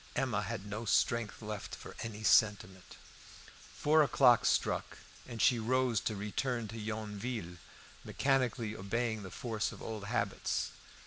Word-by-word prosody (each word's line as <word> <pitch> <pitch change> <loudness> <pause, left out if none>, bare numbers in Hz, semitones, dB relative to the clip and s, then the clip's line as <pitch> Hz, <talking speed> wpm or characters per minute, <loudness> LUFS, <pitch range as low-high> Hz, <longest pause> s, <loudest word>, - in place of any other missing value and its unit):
Emma - - 0
had 100 - -4
no 105 +2 -5
strength 115 0 +1
left 105 -1 -5
for - - -11
any 110 -1 -6
sentiment. 100 -4 +2 0.8
Four 155 +1 +4
o'clock 130 -5 +5
struck, - - 0 0.3
and 120 -2 -7
she 120 +2 +4
rose 125 0 +2
to 110 - -2
return 110 +4 -2
to 115 - -6
Yonville, 105 -3 -4 0.5
mechanically 125 -5 0
obeying 110 +3 -2
the 95 - -7
force 110 +1 -2
of - - -11
old 110 -3 -6
habits. 110 -2 -1
110 Hz, 135 wpm, -33 LUFS, 105-120 Hz, 0.8 s, o'clock